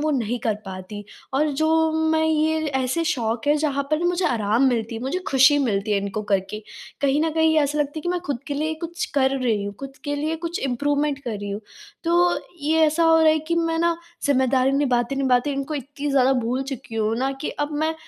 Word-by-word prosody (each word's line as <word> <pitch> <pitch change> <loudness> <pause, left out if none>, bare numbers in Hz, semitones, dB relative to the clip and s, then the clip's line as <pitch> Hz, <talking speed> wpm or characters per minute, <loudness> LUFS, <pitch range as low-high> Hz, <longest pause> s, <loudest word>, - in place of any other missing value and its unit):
वो 310 - +2
नहीं 240 +1 -2
कर 215 - +2
पाती, 190 +2 -8 0.3
और 300 +2 +2
जो 320 +2 +2 0.2
मैं 320 0 +2
ये 315 0 +1 0.2
ऐसे 265 +7 -1
शौक 230 -3 -1
हैं 295 +1 +4
जहाँ 285 -2 0
पर 305 - +2
ना 350 - +1
मुझे 355 +1 0
आराम 225 +2 +1
मिलती 230 -2 -1
है 225 - -5
मुझे 275 +8 -1
खुशी 270 +2 +5
मिलती 210 -5 0
है 200 - +3
इनको 200 +2 -3
करके। 205 +1 -2 0.4
कहीं 280 +1 +2
न 325 - +1
कहीं 320 0 +3
ऐसा 295 +1 0
लगता 290 -1 0
है - - -2
कि 350 - -3
मैं 355 0 0
खुद 280 -4 -2
के 285 - -3
लिए 310 +2 -1
कुछ 340 +1 -3
कर 270 -1 +2
रही 225 -6 0
हूँ, 200 0 -5
खुद 275 0 -8
के 290 0 -1
लिए 310 +3 -1
कुछ 335 +1 -3
इम्प्रूवमेंट 285 +3 0
कर 225 -4 -3
रही 205 0 -5
हूँ। 200 +2 -4 0.4
तो 345 +1 +3 0.2
ये 315 +2 +2
ऐसा 320 +2 +2
हो 325 0 +6
रहा 320 - +5
है 315 - +1
कि 335 - +2
मैं 330 -1 0
ना 340 0 +2 0.3
ज़िम्मेदारी 265 -1 +2
निभाते-निभाते 260 +1 +1
इनको 275 +2 -3
इतनी 285 +1 -5
ज़्यादा 265 -1 +4
भूल 250 +4 -1
चुकी 230 -3 -7
हूँ 220 0 0
ना 265 +1 0
कि - - -2
अब 300 - -8
मैं 315 +1 0
275 Hz, 225 wpm, -23 LUFS, 235-315 Hz, 0.4 s, हो